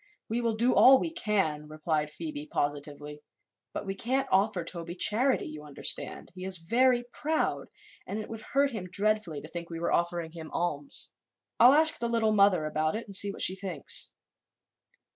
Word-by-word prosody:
"We 235 +2 -1
will 230 -2 0
do 240 +3 +2
all 265 0 +7
we 330 - -3
can," 195 - -1
replied 155 0 -2
Phoebe, 300 - -6
positively, 145 +1 -3 0.5
"but - - -5
we 195 - -3
can't 255 +7 -1
offer 195 -1 +2
Toby 170 0 -6
charity, 245 +8 +2
you 150 0 -8
understand. 145 -2 -5
He 185 0 -9
is 190 0 -2
very 240 +8 +2
proud 310 +1 -1 0.4
and 200 - -4
it 215 - -5
would 225 -1 -7
hurt 280 +4 +1
him 205 -6 -6
dreadfully 200 -6 0
to - - -10
think 170 +1 -7
we 165 -1 -6
were 170 - -1
offering 170 -1 -1
him 160 -2 -9
alms. 145 -5 -1 0.5
I'll 250 +3 +8
ask 315 +2 +4
the 235 - -2
Little 225 -2 +2
Mother 200 -6 +4
about 155 +2 -1
it 230 - -5
and 200 - -3
see 200 +1 +6
what - - -1
she 185 - +5
thinks." 185 -7 -2
195 Hz, 180 wpm, -29 LUFS, 160-235 Hz, 0.5 s, I'll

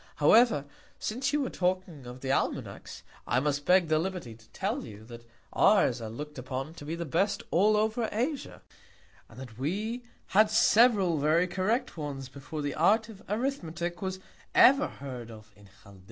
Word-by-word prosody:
However, 155 - +4 0.3
since 260 +6 -2
you 295 0 +1
were 265 - -2
talking 180 -7 -2
of 125 +1 -9
the 135 - -2
Almanacks, - - -3 0.2
I 125 - +2
must 145 +1 -1
beg 180 -1 +4
the 155 0 +2
Liberty 175 -9 -4
to 115 0 -20
tell - - -3
you, 110 -1 -11
that 120 0 -12 0.3
ours 130 - +4
are 110 - -5
look'd 150 +5 -7
upon 130 +4 -5
to 150 - -11
be 160 +3 -3
the 170 0 -4
best 175 +7 0
all 210 +4 +4
over 220 +2 0
Asia; 260 +7 -3 0.7
and 115 - -14
that 125 -3 -10
we 215 - -2 0.3
had 210 +2 +5
several 215 -6 +4
very 155 +5 +3
correct 190 +6 -1
ones 140 -4 -5
before 140 +3 -7
the 145 - -2
Art 215 +7 +3
of 205 -3 -12
Arithmetick 175 - -3
was 190 -1 -3 0.4
ever 275 +3 +6
heard 125 -4 -8
of 110 -1 -13
in 100 0 -18
Chaldea. 100 -1 -15
170 Hz, 175 wpm, -29 LUFS, 135-210 Hz, 0.7 s, ever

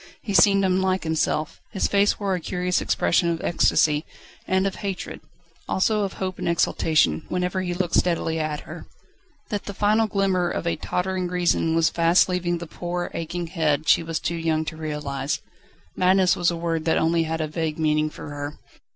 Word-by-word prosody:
He 205 - -3
seemed 195 -1 +5
unlike 190 0 +1
himself. 160 -1 -1
His 195 - -1
face 200 0 +2
wore 200 -2 0
a 180 - -1
curious 180 +1 -1
expression 170 0 +2
of 165 -1 -1
ecstasy 155 -2 +2 0.4
and 190 +1 +2
of 195 - -2
hatred, 195 -3 -5 0.5
also 210 +3 +2
of 195 -2 -2
hope 185 -1 -4
and - - -1
exultation, 155 - +2
whenever 180 +1 -1
he 175 -1 -2
looked 175 -2 -2
steadily 165 -2 +1
at 155 -1 -2
her. - - -10 0.6
That 205 -3 -3
the 200 - -6
final 215 +2 +2
glimmer 190 -3 +1
of 170 - -3
a 170 - +1
tottering 185 0 -2
reason 175 -2 +1
was 165 -1 +3
fast 170 +1 +4
leaving 180 -1 -1
the 170 - -6
poor, 175 +2 -4
aching 170 +1 -4
head 160 -3 0
she - - +5
was 165 -1 -3
too 170 - -2
young 160 -1 0
to 160 - -5
realise. 150 -3 -3 0.6
Madness 185 0 +4
was 175 -1 +2
a 170 - -3
word 165 -1 -2
that 160 - +2
had - - +2
only 165 0 +2
a 160 -1 -2
vague 155 0 -3
meaning 155 -1 +1
for 150 - -9
her. 145 +1 -6
170 Hz, 185 wpm, -24 LUFS, 160-185 Hz, 0.6 s, seemed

